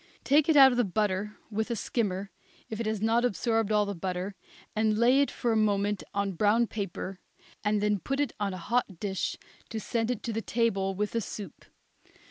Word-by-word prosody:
Take 295 Hz, +3 st, +4 dB
it 310 Hz, -, +5 dB
out 270 Hz, -1 st, +9 dB
of 245 Hz, -, 0 dB
the -, -, +5 dB
butter 210 Hz, +1 st, -1 dB
with 220 Hz, +3 st, -1 dB
a 235 Hz, -, 0 dB
skimmer, 200 Hz, -4 st, -2 dB, 0.4 s
if 220 Hz, -, -4 dB
it 230 Hz, -, -1 dB
has 215 Hz, -1 st, -1 dB
not 230 Hz, +2 st, +3 dB
absorbed 225 Hz, -2 st, +1 dB
all 210 Hz, -1 st, +3 dB
the 200 Hz, -, -3 dB
butter, 185 Hz, +2 st, -3 dB, 0.4 s
and 215 Hz, 0 st, +2 dB
lay 250 Hz, +4 st, +5 dB
it 280 Hz, -, +2 dB
for 240 Hz, -, -1 dB
a -, -, +2 dB
moment 205 Hz, -2 st, +1 dB
on 200 Hz, 0 st, -1 dB
brown 210 Hz, +6 st, +3 dB
paper, 195 Hz, -3 st, -5 dB, 0.4 s
and 210 Hz, 0 st, +1 dB
then 210 Hz, -1 st, +2 dB
put 275 Hz, +8 st, -2 dB
it 290 Hz, -4 st, 0 dB
on 205 Hz, -1 st, 0 dB
a 185 Hz, -, -5 dB
hot 200 Hz, -1 st, -1 dB
dish 190 Hz, -3 st, -2 dB, 0.3 s
to 225 Hz, -, -3 dB
send 230 Hz, +1 st, -2 dB
to 230 Hz, -, -3 dB
the 225 Hz, -, -1 dB
table 195 Hz, -5 st, 0 dB
with 210 Hz, +2 st, -1 dB
the 230 Hz, -, 0 dB
soup. 200 Hz, -4 st, -8 dB
215 Hz, 205 wpm, -29 LUFS, 200-230 Hz, 0.4 s, out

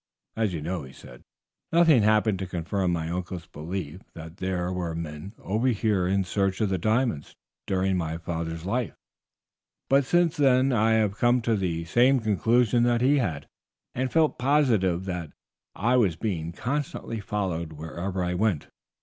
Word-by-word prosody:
"As 110 Hz, -3 st, 0 dB
you 80 Hz, -4 st, -4 dB
know," 90 Hz, +1 st, -3 dB
he 65 Hz, -1 st, -11 dB
said, -, -, -14 dB, 0.5 s
"nothing 165 Hz, -7 st, +5 dB
happened 105 Hz, -1 st, +3 dB
to 95 Hz, -, -4 dB
confirm 90 Hz, +1 st, -1 dB
my 80 Hz, -2 st, -2 dB
uncle's 90 Hz, 0 st, -4 dB
belief 85 Hz, +2 st, -6 dB
that 80 Hz, +1 st, -10 dB
there 90 Hz, -1 st, -2 dB
were 85 Hz, -3 st, -3 dB
men 80 Hz, +4 st, -6 dB
over 110 Hz, +6 st, -1 dB
here 105 Hz, -6 st, +1 dB
in 95 Hz, +1 st, +1 dB
search 95 Hz, 0 st, -1 dB
of 110 Hz, -3 st, +1 dB
the 95 Hz, -1 st, -1 dB
diamonds 110 Hz, -, 0 dB, 0.3 s
during 95 Hz, 0 st, +1 dB
my 80 Hz, -2 st, -2 dB
father's 85 Hz, 0 st, -4 dB
life, 120 Hz, +4 st, -2 dB, 1.0 s
but 140 Hz, +1 st, +5 dB
since 175 Hz, +3 st, +2 dB
then 135 Hz, -2 st, +4 dB
I 110 Hz, 0 st, +3 dB
have 105 Hz, -3 st, +1 dB
come 120 Hz, +1 st, +4 dB
to 115 Hz, -1 st, +2 dB
the 85 Hz, -4 st, -2 dB
same 125 Hz, +9 st, +4 dB
conclusion 115 Hz, +2 st, +2 dB
that 120 Hz, 0 st, +2 dB
he 140 Hz, +3 st, +4 dB
had, 80 Hz, -, -2 dB, 0.5 s
and 130 Hz, 0 st, -2 dB
felt 160 Hz, -2 st, +2 dB
positive 115 Hz, -, +2 dB
that 90 Hz, -5 st, -5 dB, 0.4 s
I 120 Hz, +6 st, +2 dB
was 100 Hz, -9 st, +3 dB
being 85 Hz, -4 st, -3 dB
constantly 125 Hz, -, -3 dB
followed 90 Hz, -6 st, -3 dB
wherever 85 Hz, +5 st, -4 dB
I 90 Hz, 0 st, -1 dB
went. 90 Hz, -5 st, 0 dB
95 Hz, 165 wpm, -26 LUFS, 85-120 Hz, 1.0 s, nothing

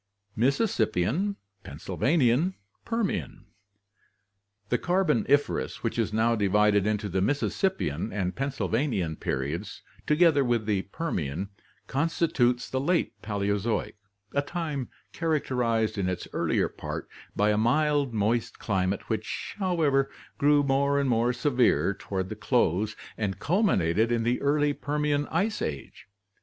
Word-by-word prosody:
Mississippian, 135 Hz, -, +1 dB, 0.3 s
Pennsylvanian, 150 Hz, +4 st, +1 dB, 0.3 s
Permian. 215 Hz, -, -2 dB, 0.6 s
— 100 Hz, 0 st, -44 dB
The 125 Hz, -, +1 dB
Carboniferous, 180 Hz, -4 st, +1 dB
which 115 Hz, 0 st, -1 dB
is 110 Hz, -2 st, 0 dB
now 115 Hz, +2 st, +2 dB
divided 105 Hz, 0 st, +3 dB
into 105 Hz, 0 st, 0 dB
the 95 Hz, 0 st, -1 dB
Mississippian 135 Hz, -, 0 dB
and 95 Hz, -2 st, -2 dB
Pennsylvanian 130 Hz, -, -1 dB
periods, 80 Hz, +10 st, -3 dB, 0.2 s
together 150 Hz, -2 st, +4 dB
with 120 Hz, -3 st, 0 dB
the 105 Hz, -3 st, +1 dB
Permian, 95 Hz, -, -3 dB, 0.4 s
constitutes 135 Hz, -5 st, +1 dB
the 130 Hz, -, -2 dB
Late 140 Hz, -, 0 dB
Paleozoic, 105 Hz, +1 st, -1 dB, 0.4 s
a 140 Hz, -, +2 dB
time 150 Hz, -4 st, -4 dB, 0.2 s
characterized 125 Hz, -9 st, 0 dB
in 95 Hz, -1 st, 0 dB
its 90 Hz, -1 st, -4 dB
earlier -, -, +1 dB
part -, -, -6 dB, 0.3 s
by 105 Hz, +1 st, +3 dB
a -, -, +2 dB
mild, 145 Hz, +4 st, +2 dB
moist 110 Hz, +2 st, 0 dB
climate 95 Hz, -2 st, -1 dB
which, -, -, -4 dB
however, 155 Hz, -8 st, +2 dB, 0.3 s
grew 145 Hz, 0 st, +4 dB
more 140 Hz, +1 st, +2 dB
and 135 Hz, -2 st, +1 dB
more 120 Hz, +1 st, +2 dB
severe 125 Hz, -5 st, +2 dB
toward 95 Hz, -1 st, -4 dB
the -, -, -5 dB
close 105 Hz, +6 st, +1 dB, 0.2 s
and 100 Hz, -3 st, -1 dB
culminated 115 Hz, -, +2 dB
in 115 Hz, -1 st, +1 dB
the 120 Hz, +2 st, 0 dB
early 145 Hz, +1 st, +2 dB
Permian 145 Hz, 0 st, -1 dB
ice 205 Hz, +6 st, -1 dB
age. 70 Hz, +4 st, -5 dB
120 Hz, 125 wpm, -27 LUFS, 100-145 Hz, 0.6 s, together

